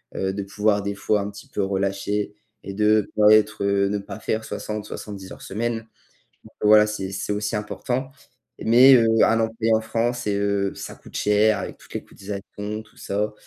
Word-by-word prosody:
heu, 95 Hz, 0 st, -1 dB
de 100 Hz, +1 st, -4 dB
pouvoir 105 Hz, +1 st, +1 dB
des 100 Hz, 0 st, -2 dB
fois 100 Hz, +1 st, +1 dB
un 100 Hz, +1 st, -4 dB
petit 100 Hz, -, -12 dB
peu 100 Hz, -, -2 dB
relâcher 100 Hz, +1 st, -1 dB, 0.3 s
et 100 Hz, -, -6 dB
de 105 Hz, 0 st, +2 dB
pas 105 Hz, 0 st, +6 dB
être, 110 Hz, -1 st, +3 dB
heu, 100 Hz, 0 st, +2 dB
ne 105 Hz, -, 0 dB
pas 100 Hz, +1 st, -8 dB
faire 110 Hz, 0 st, -2 dB
60, 105 Hz, -1 st, -5 dB
70 100 Hz, -3 st, -8 dB
heures -, -, -10 dB
semaine. 115 Hz, +3 st, -2 dB, 0.7 s
Donc, -, -, -16 dB
heu, -, -, +4 dB
voilà, 105 Hz, 0 st, +7 dB
c'est 100 Hz, -3 st, -4 dB
c'est 95 Hz, +2 st, -3 dB
aussi 105 Hz, +1 st, -2 dB
important. 125 Hz, +5 st, -3 dB, 0.5 s
Mais 125 Hz, +4 st, +7 dB
heu, 115 Hz, -3 st, +5 dB, 0.2 s
un 115 Hz, 0 st, +3 dB
employé 115 Hz, 0 st, 0 dB
en 110 Hz, -, +3 dB
France 120 Hz, +2 st, -2 dB
et 105 Hz, -, +1 dB
heu, 100 Hz, -1 st, 0 dB
ça -, -, -7 dB
coûte -, -, -12 dB
cher 105 Hz, 0 st, +3 dB
avec -, -, -7 dB
toutes -, -, -16 dB
les -, -, -4 dB
cotisations, 105 Hz, +2 st, -7 dB
tout 105 Hz, -, -25 dB
ça. 105 Hz, +2 st, -2 dB
105 Hz, 200 wpm, -23 LUFS, 100-110 Hz, 0.7 s, voilà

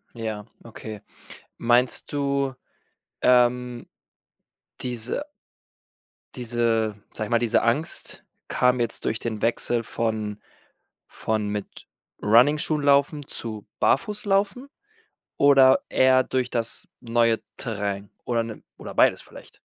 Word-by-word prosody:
Ja, 110 Hz, -2 st, -4 dB, 0.2 s
okay. 110 Hz, -2 st, -9 dB, 0.6 s
Meinst 120 Hz, +4 st, +1 dB
du, 140 Hz, -1 st, 0 dB, 0.7 s
ähm, 125 Hz, -1 st, +3 dB, 0.9 s
diese 125 Hz, -, -3 dB, 1.1 s
diese 115 Hz, -3 st, 0 dB, 0.2 s
sage 110 Hz, -, -3 dB
ich -, -, -11 dB
mal, 115 Hz, -, +4 dB
diese 120 Hz, -2 st, +2 dB
Angst 120 Hz, +8 st, -1 dB, 0.2 s
kam 125 Hz, 0 st, +2 dB
jetzt 120 Hz, -2 st, -1 dB
durch 110 Hz, -, 0 dB
den 110 Hz, -3 st, -4 dB
Wechsel 115 Hz, 0 st, 0 dB
von 110 Hz, -2 st, -2 dB, 0.7 s
von 110 Hz, -1 st, -2 dB
mit 105 Hz, -1 st, -6 dB, 0.4 s
Runningschuhen-laufen 145 Hz, +4 st, +3 dB
zu 110 Hz, -3 st, -6 dB
Barfußlaufen? 205 Hz, -, +1 dB, 0.7 s
Oder 135 Hz, -2 st, +6 dB
eher 130 Hz, 0 st, +4 dB
durch 130 Hz, -1 st, -1 dB
das 115 Hz, -1 st, -2 dB
neue 115 Hz, -1 st, +2 dB, 0.2 s
Terrain 100 Hz, -4 st, -3 dB, 0.2 s
oder, 115 Hz, -1 st, +1 dB
ne, 115 Hz, -2 st, -8 dB, 0.2 s
oder -, -, -8 dB
beides -, -, +4 dB
vielleicht? -, -, -15 dB
120 Hz, 105 wpm, -25 LUFS, 110-130 Hz, 1.1 s, Oder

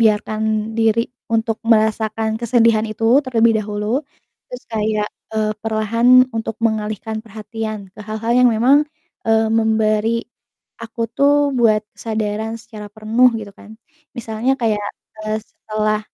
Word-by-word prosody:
biarkan 215 Hz, 0 st, +1 dB
diri 225 Hz, 0 st, +3 dB, 0.3 s
untuk 225 Hz, 0 st, 0 dB
merasakan 220 Hz, 0 st, +1 dB
kesedihan 230 Hz, -2 st, +3 dB
itu 215 Hz, +1 st, -4 dB, 0.2 s
terlebih 230 Hz, -3 st, +3 dB
dahulu, 210 Hz, +4 st, -2 dB, 0.5 s
terus 250 Hz, 0 st, -8 dB
kayak, 215 Hz, -1 st, 0 dB, 0.3 s
eee, 215 Hz, -1 st, 0 dB
perlahan 230 Hz, +3 st, +4 dB
untuk 225 Hz, -1 st, -3 dB
mengalihkan 220 Hz, 0 st, -2 dB
perhatian 215 Hz, -2 st, -6 dB
ke -, -, -13 dB
hal-hal 220 Hz, +2 st, -2 dB
yang 250 Hz, -, +6 dB
memang, 240 Hz, +5 st, +4 dB, 0.5 s
eee, 225 Hz, 0 st, +4 dB
memberi 220 Hz, 0 st, +1 dB, 0.6 s
aku 230 Hz, +1 st, -5 dB
tuh 285 Hz, 0 st, +3 dB
buat 215 Hz, -2 st, +3 dB
kesadaran 220 Hz, 0 st, -3 dB
secara 220 Hz, -2 st, -10 dB
penuh, 225 Hz, +4 st, +3 dB
gitu 205 Hz, -2 st, -9 dB
kan. 215 Hz, +2 st, -14 dB, 0.4 s
Misalnya 230 Hz, +2 st, -1 dB
kayak, 215 Hz, -3 st, 0 dB, 0.4 s
eee, 215 Hz, 0 st, -1 dB
setelah 215 Hz, -1 st, -2 dB
220 Hz, 125 wpm, -19 LUFS, 215-230 Hz, 0.6 s, yang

